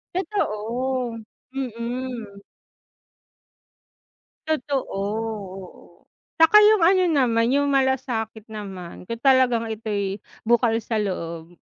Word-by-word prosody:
Totoo, 255 - -1 0.4
mm. 240 -4 -5 2.1
Totoo 290 -3 0 0.2
oo, 200 -2 -6 0.3
'tsaka 325 +6 +7
yung 420 -5 +6
ano 370 +1 +5
naman 240 -6 +2
yung 285 +2 +2
malasakit 240 -5 0
naman 195 -5 -8
kung 230 - -3
talagang 250 -3 +3
ito'y 205 -2 -3 0.2
bukal 235 -1 +3
sa 225 -1 -2
loob. 170 -3 -5
230 Hz, 85 wpm, -23 LUFS, 210-265 Hz, 2.1 s, tsaka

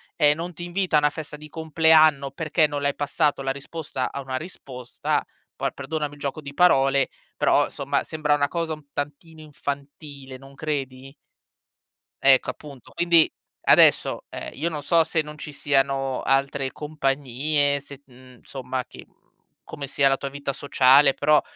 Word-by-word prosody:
e 150 -2 +4
non 170 +3 -6
ti 175 - -8
invita 175 -2 0
a - - +6
una 150 0 +3
festa 150 0 -8
di 150 0 -12
compleanno, 155 -3 +3
perché 155 +2 +1
non 145 -1 -4
le 140 - +2
hai 140 - -4
passato 145 0 0
la 135 - -3
risposta 140 -1 -5
a 140 - -5
una 130 -1 -5
risposta, 130 -6 -4 0.3
poi - - -3
perdonami 150 -2 -4
il 145 - -14
gioco 140 +2 -4
di 140 -1 -9
parole, 135 -5 +3 0.3
però - - +3
somma, 140 0 -2
sembra 150 -2 0
una 145 -1 +1
cosa 165 0 -3
un 155 -1 -10
tantino 150 +3 -6
infantile, 140 -2 -7
non 135 +1 -15
credi? 135 -3 -5 1.1
Ecco 135 -1 +5
appunto, 140 -5 -14
quindi 170 -1 +4 0.3
adesso, - - +5
ehm, - - -7
io 160 +5 -2
non 150 -3 -6
so 165 +2 +4
se 160 0 -1
non 150 0 -11
ci 150 - -7
siano 135 -2 0
altre 135 0 0
compagnie, 145 0 -1
se, 140 0 -13
mhmm, 125 -1 -17
somma 130 -1 -5
ti - - -13 0.6
come 140 -1 -7
sia 140 +1 +2
la 135 0 +2
tua 140 - -5
vita 140 0 -4
sociale, 140 0 +4
però 150 +1 +3
145 Hz, 165 wpm, -24 LUFS, 135-155 Hz, 1.1 s, a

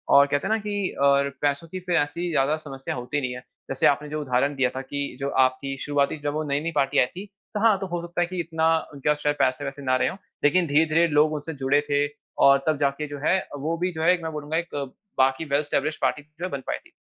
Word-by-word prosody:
और 140 0 +8
कहते 145 +5 0
है 220 - +2
ना - - +3
कि 205 -2 -2
और 140 0 +4
पैसों 145 +3 0
की 185 +3 -6
फिर 180 -1 -1
ऐसी 170 +4 -1
ज़्यादा 145 0 +2
समस्या 135 -4 -6
होती 125 +4 -2
नहीं 125 -2 -2
है। - - -6 0.3
जैसे 135 0 +2
आपने 145 +1 +1
जो 155 +1 -3
उदाहरण 140 +1 +1
दिया 130 -2 +2
था 130 - -2
कि, 140 0 -4
जो 140 0 -1
आपकी 130 +1 +1
शुरुआती 145 +1 0
जब 145 - -1
वो 155 +1 -1
नई-नई 150 +4 0
पार्टी 135 0 +2
आई - - +5
थी 185 +10 -9 0.3
तो 210 - -1
हाँ 215 -2 +5
तो 195 - -4
हो 175 -1 -3
सकता 175 +1 -3
है 175 - +1
कि 185 0 -5
इतना 160 -1 0 0.3
उनके 140 +1 -2
पास 150 0 +2
शायद 145 0 +2
पैसे-वैसे 140 +2 0
ना 130 -1 +2
रहे - - +2
हो। - - -4 0.3
लेकिन 170 +4 +3
धीरे-धीरे 160 +3 +3
लोग 155 0 +3
उनसे 155 +2 -4
जुड़े 145 +2 +3
थे, 145 0 +2 0.3
और 140 0 +6
तब 155 -1 +2
जाके 140 +1 0
जो 145 0 -7
है, 175 +6 +3 0.2
वो 155 +4 -2
भी 180 +2 -1
जो 160 -2 -5
है 175 - +6
एक 180 - -2
मैं 160 - -3
बोलूँगा 150 +1 -3
एक 170 -2 -4 0.4
बाकी 135 +4 +2
वेल 140 -1 +1
एस्टाब्लिशड 150 +1 -1
पार्टी 150 - +1 0.2
जो 185 - -1
बन 140 -1 -4
पायी - - -2
थी। - - -22
145 Hz, 255 wpm, -25 LUFS, 140-165 Hz, 0.4 s, और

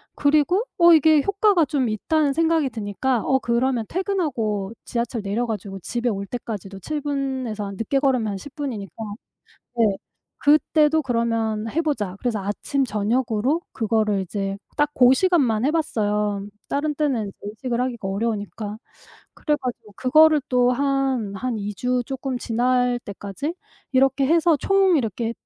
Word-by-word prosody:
그리고 305 +8 +3
'어 345 -1 +7
이게 315 -1 +5
효과가 400 0 +3
좀 265 -3 0
있다.'는 285 +7 +1
생각이 325 -2 +2
드니까 220 +3 -1
어 265 - +2
그러면 240 -1 0
퇴근하고 250 - -1
지하철 235 -1 -2
내려 205 +5 -1
가지고 200 -4 -5
집에 240 +6 -3
올 200 -2 -3
때까지도 200 -5 -6
7 300 +8 -4
분에서 265 -7 -3
한 200 0 -6
늦게 230 +6 0
걸으면 260 -5 +1
한 195 - -4
10 275 +8 -11
분이니까 225 - -5 0.9
네. 230 - +5 0.6
'그때도 305 +1 +4
그러면 230 -3 -1
해 330 +7 0
보자.' 220 - -2
그래서 240 -4 -1
아침 235 +8 -1
저녁으로 235 +6 0
그거를 215 -3 +1
이제 195 +1 -3 0.2
딱 295 0 +2
고 250 -2 +6
시간만 265 - +2
해 - - +3
봤어요. 210 -9 -1 0.2
다른 300 +1 -1
때는 275 -8 0
이제 195 - -12
의식을 235 +4 -3
하기가 245 -5 -2
어려우니까. 210 0 -3 0.6
그래 300 - 0
가지고 245 -5 -6
그거를 310 +4 +5
또 250 -1 +3
한, 270 -5 0
한 245 +2 -2
2 205 0 -4
주 250 +2 0
쪼끔 265 -1 -3
지날 245 +1 +1
때까지 200 - -5 0.4
이렇게 270 +1 +3
해서 330 +1 +4
총 390 +1 +3
이렇게 230 -2 -1
250 Hz, 315 characters per minute, -23 LUFS, 215-290 Hz, 0.9 s, 어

